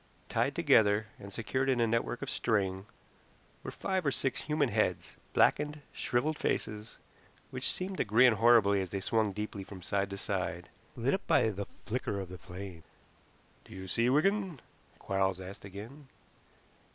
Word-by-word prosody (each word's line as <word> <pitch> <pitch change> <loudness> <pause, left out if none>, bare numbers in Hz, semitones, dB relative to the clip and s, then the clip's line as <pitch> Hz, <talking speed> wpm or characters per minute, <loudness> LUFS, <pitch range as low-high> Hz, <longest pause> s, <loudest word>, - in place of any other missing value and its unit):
Tied 120 +5 +1
together, 110 -10 +4
and 100 - -9
secured 130 +6 -1
in 130 -2 +2
a 115 - +4
network 115 +2 -1
of - - -4
string, 95 -3 0 0.7
were - - -6
five 190 -1 -2
or 145 - +2
six 135 -1 -1
human 150 -3 +1
heads, 105 -5 0 0.2
blackened, 150 +1 +3
shriveled 150 +5 0
faces, 105 +1 -2 0.5
which 130 0 +1
seemed 185 +1 -3
to - - +2
grin 120 +3 +5
horribly 110 -3 +5
as 95 - -4
they 100 - -3
swung 110 +2 +1
deeply 105 0 -5
from 95 -2 -10
side 100 +1 0
to 100 - -5
side, - - -3 0.3
lit - - +1
up - - -2
by 110 - +4
the 100 0 -5 0.2
flicker 115 -4 -2
of 95 -2 -6
the 90 -1 -9
flames. 90 -2 -8 0.8
"Do - - -13
you 95 0 -7
see, 115 +6 +2
Wigan?" 185 +3 +2 0.4
Quarles 95 -1 0
asked 95 +2 -9
again. 110 +9 -10
110 Hz, 165 wpm, -31 LUFS, 100-135 Hz, 0.8 s, grin